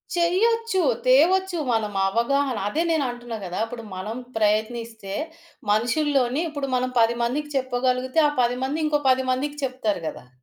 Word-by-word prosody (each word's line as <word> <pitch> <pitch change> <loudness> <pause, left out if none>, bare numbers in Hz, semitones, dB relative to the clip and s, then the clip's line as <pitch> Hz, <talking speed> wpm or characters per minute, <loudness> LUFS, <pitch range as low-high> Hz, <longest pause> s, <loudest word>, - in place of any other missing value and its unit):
చెయ్యొచ్చు 390 +4 +2 0.3
తేవొచ్చు 355 +7 +4
మనం 215 -2 0
అవగాహన. 250 +6 +1
అదే 325 +7 0
నేనంటున్నా 245 -6 -2
గదా! 180 +2 -4
ఇప్పుడు 230 0 -8
మనం 210 +5 -5 0.2
ప్రయత్నిస్తే 220 -1 -1 0.6
మనుషుల్లోని 260 +4 +1
ఇప్పుడు 285 -2 -4
మనం 255 0 0
10 230 +1 +3
మందికి 295 +5 -2
చెప్పగలిగితే 255 +2 +1
ఆ - - -3
10 245 +1 +1
మంది 290 +4 -1
ఇంకో 295 -1 +1
10 260 0 +1
మందికి 290 +3 -2
చెప్తారు 220 -8 -2
గదా! 125 - -12
255 Hz, 140 wpm, -24 LUFS, 230-295 Hz, 0.6 s, తేవొచ్చు